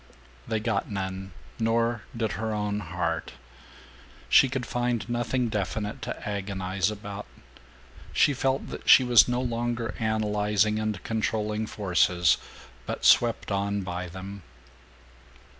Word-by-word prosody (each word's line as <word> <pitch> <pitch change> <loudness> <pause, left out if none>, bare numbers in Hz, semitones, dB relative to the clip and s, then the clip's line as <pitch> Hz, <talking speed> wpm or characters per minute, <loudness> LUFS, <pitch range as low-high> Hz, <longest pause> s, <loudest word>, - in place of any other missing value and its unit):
They 110 - 0
got 110 -2 -1
none, 95 -1 -4 0.3
nor 115 0 +1 0.2
did 110 -2 0
her 110 0 -2
own 105 0 -1
heart. 85 -5 -3 1.0
She 135 - +6
could 130 -1 -3
find 120 -2 -1
nothing 120 +1 0
definite 105 +3 -3
to 110 - -5
agonize 95 -1 -1
about. 105 - -7 0.8
She 145 - +4
felt 135 0 -1
that - - -6
she 130 - +9
was 120 -2 +6
no 125 0 0
longer 120 -2 -2
analyzing 105 -1 +1
and 110 -3 -2
controlling 110 -1 -1
forces, 90 -5 +2 0.5
but - - -4
swept 115 -3 +4
on 100 +1 0
by 90 0 -4
them. 95 +3 -8
105 Hz, 125 wpm, -27 LUFS, 100-115 Hz, 1.0 s, she